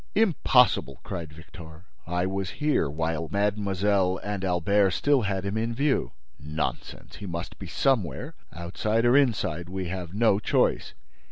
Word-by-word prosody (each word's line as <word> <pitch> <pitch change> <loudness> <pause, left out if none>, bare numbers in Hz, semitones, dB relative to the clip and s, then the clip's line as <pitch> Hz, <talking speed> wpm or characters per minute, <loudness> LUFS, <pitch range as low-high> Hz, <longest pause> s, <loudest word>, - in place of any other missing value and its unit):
"Impossible!" 130 - +3
cried 80 -3 -6
Victor. 80 +1 -13 0.2
"I 90 +1 0
was 95 0 -2
here 150 - +1
while 80 +1 -2
mademoiselle 100 -2 +1
and 100 -1 -3
Albert 95 +2 +2
still 145 -2 +2
had 100 -2 -2
him 100 +2 -2
in 115 +1 -2
view." 135 - 0 0.3
"Nonsense, 75 +2 -5
he 100 - -7
must 85 0 -6
be 95 - -7
somewhere! 95 - 0 0.2
Outside 105 +7 -1
or 120 +2 +5
inside: 95 - +1
we 95 -1 -4
have 90 -1 -5
no 105 -2 +3
choice!" 105 - +1
95 Hz, 145 wpm, -26 LUFS, 85-110 Hz, 0.3 s, or